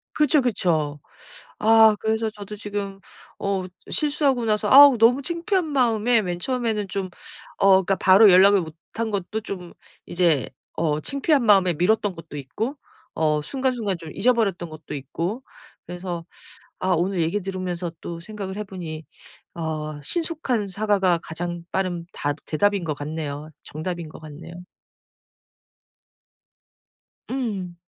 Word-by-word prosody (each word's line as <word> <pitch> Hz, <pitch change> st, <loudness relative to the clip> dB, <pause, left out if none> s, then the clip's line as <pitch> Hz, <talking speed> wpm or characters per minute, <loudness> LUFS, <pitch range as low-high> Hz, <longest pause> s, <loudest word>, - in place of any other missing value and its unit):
그쵸, 300 Hz, -1 st, +4 dB
그쵸. 160 Hz, -, 0 dB, 0.6 s
아 220 Hz, 0 st, +6 dB
그래서 220 Hz, 0 st, 0 dB
저도 210 Hz, -1 st, -9 dB
지금 200 Hz, -2 st, -5 dB, 0.4 s
어 195 Hz, -2 st, -1 dB, 0.3 s
실수하고 285 Hz, -5 st, +1 dB
나서 210 Hz, -1 st, +1 dB
아우 275 Hz, -3 st, +9 dB
너무 245 Hz, +5 st, +4 dB
창피한 340 Hz, +4 st, 0 dB
마음에 240 Hz, -5 st, +2 dB
맨 175 Hz, -2 st, -3 dB
처음에는 225 Hz, -1 st, -1 dB
좀 190 Hz, -1 st, -3 dB, 0.5 s
어 195 Hz, -, +4 dB, 0.2 s
그러니까 195 Hz, +2 st, +1 dB
바로 195 Hz, +3 st, +7 dB
연락을 195 Hz, +2 st, +6 dB
못 160 Hz, -3 st, -7 dB, 0.2 s
한 225 Hz, 0 st, -2 dB
것도 200 Hz, +3 st, -2 dB
좀 180 Hz, -4 st, -7 dB, 0.3 s
이제 170 Hz, -6 st, +1 dB, 0.2 s
어 155 Hz, -2 st, 0 dB
창피한 280 Hz, -, +1 dB
마음에 195 Hz, -4 st, +5 dB
미뤘던 200 Hz, +4 st, +1 dB
것도 165 Hz, -3 st, -10 dB
있고 205 Hz, -, -4 dB, 0.4 s
어 155 Hz, -1 st, +1 dB
순간 265 Hz, -, -1 dB
순간 215 Hz, -6 st, -2 dB
좀 165 Hz, -2 st, -10 dB
잊어버렸던 200 Hz, -5 st, +1 dB
것도 155 Hz, 0 st, -10 dB
있고 170 Hz, -, -4 dB, 0.4 s
그래서 175 Hz, -1 st, -5 dB, 0.5 s
아 185 Hz, -, -2 dB
오늘 180 Hz, +2 st, 0 dB
얘기 170 Hz, +6 st, 0 dB
들으면서 185 Hz, -2 st, -4 dB
또 170 Hz, -, -6 dB
생각을 200 Hz, 0 st, -7 dB
해 210 Hz, -, -3 dB
보니 165 Hz, -5 st, -7 dB, 0.5 s
어 155 Hz, -2 st, -4 dB
신속한 305 Hz, -, -1 dB
사과가 195 Hz, -3 st, +1 dB
가장 175 Hz, +1 st, -5 dB
빠른 175 Hz, -3 st, -2 dB
답 145 Hz, 0 st, -2 dB
대답인 200 Hz, +3 st, +1 dB
것 155 Hz, -, -2 dB
같네요. 150 Hz, 0 st, -5 dB
정답인 170 Hz, +1 st, -5 dB
것 155 Hz, -, -12 dB
같네요. 155 Hz, +2 st, -10 dB, 2.8 s
음. 205 Hz, -9 st, -3 dB
195 Hz, 275 characters per minute, -23 LUFS, 170-225 Hz, 2.8 s, 아우